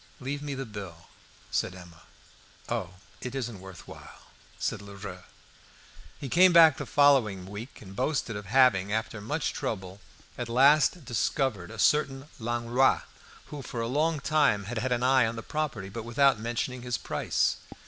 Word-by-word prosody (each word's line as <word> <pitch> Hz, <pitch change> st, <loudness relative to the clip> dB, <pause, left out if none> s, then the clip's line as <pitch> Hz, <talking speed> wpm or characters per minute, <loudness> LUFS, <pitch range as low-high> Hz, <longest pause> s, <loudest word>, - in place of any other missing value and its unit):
"Leave 140 Hz, +2 st, -4 dB
me 145 Hz, -1 st, -4 dB
the 135 Hz, 0 st, -4 dB
bill," 100 Hz, -7 st, -9 dB, 0.4 s
said 90 Hz, -, -1 dB
Emma. 85 Hz, -3 st, -13 dB, 0.7 s
"Oh, 95 Hz, -6 st, -3 dB, 0.3 s
it 125 Hz, +1 st, -5 dB
isn't 120 Hz, -6 st, -4 dB
worth 95 Hz, -1 st, -12 dB
while," -, -, -13 dB, 0.2 s
answered -, -, -3 dB
Lheureux. 100 Hz, -2 st, -9 dB, 0.9 s
He 140 Hz, -, -5 dB
came 180 Hz, +7 st, +6 dB
back 165 Hz, -4 st, +8 dB
the -, -, -5 dB
following 125 Hz, -10 st, +3 dB
week 105 Hz, +7 st, -9 dB
and 95 Hz, -1 st, -11 dB
boasted 130 Hz, -2 st, -1 dB
of 100 Hz, -1 st, -7 dB
having, 105 Hz, -5 st, +4 dB
after 110 Hz, 0 st, -2 dB
much 150 Hz, +8 st, -2 dB
trouble, 95 Hz, -2 st, -5 dB, 0.4 s
at 120 Hz, -1 st, -4 dB
last 145 Hz, +6 st, +4 dB
discovered 120 Hz, -5 st, -1 dB
a 115 Hz, -, -10 dB
certain 135 Hz, +3 st, +2 dB
Langlois, 120 Hz, +3 st, +2 dB, 0.5 s
who, 145 Hz, -, -5 dB
for 125 Hz, -, -6 dB
a 115 Hz, -, -1 dB
long 150 Hz, +5 st, +1 dB
time, 140 Hz, -8 st, +2 dB
had 110 Hz, +3 st, -4 dB
had 130 Hz, +2 st, -2 dB
an 120 Hz, 0 st, +1 dB
eye 130 Hz, -2 st, +4 dB
on 115 Hz, -, -4 dB
the 115 Hz, -, -6 dB
property, 145 Hz, -11 st, -3 dB
but 115 Hz, +4 st, -6 dB
without 130 Hz, +1 st, +3 dB
mentioning 120 Hz, +3 st, -3 dB
his 125 Hz, -2 st, -2 dB
price. -, -, 0 dB
120 Hz, 165 wpm, -28 LUFS, 100-135 Hz, 0.9 s, back